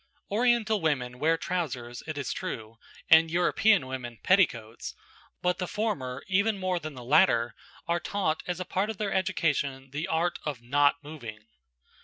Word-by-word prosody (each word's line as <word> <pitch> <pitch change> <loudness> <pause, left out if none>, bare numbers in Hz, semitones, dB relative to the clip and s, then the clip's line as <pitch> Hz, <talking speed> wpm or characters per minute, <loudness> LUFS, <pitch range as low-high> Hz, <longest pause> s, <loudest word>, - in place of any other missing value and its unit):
Oriental 220 -2 +2
women 125 -6 -1
wear 165 +3 +3
trousers, 130 -10 -3
it 155 -2 -4
is 140 -3 -2
true, 110 0 -6 0.3
and 160 0 +7
:European 180 +1 +3
women, 125 -3 -6
petticoats; 120 - +1 0.5
but 180 0 +1
the 180 - -2
former, 165 - -2
even 200 +3 +2
more 185 -2 -1
than 155 -3 -7
the 125 - -8
latter, 120 - +4 0.3
are 170 0 +1
taught 170 -3 -1
as 180 0 -2
a 185 - -3
part 195 +4 -1
of 220 - -4
their 205 -1 -2
education 140 -7 0
the 150 +5 -3
art 170 0 0
of 145 -5 -3
not 145 +4 +3
moving. 120 -8 -9
160 Hz, 160 wpm, -28 LUFS, 130-185 Hz, 0.5 s, and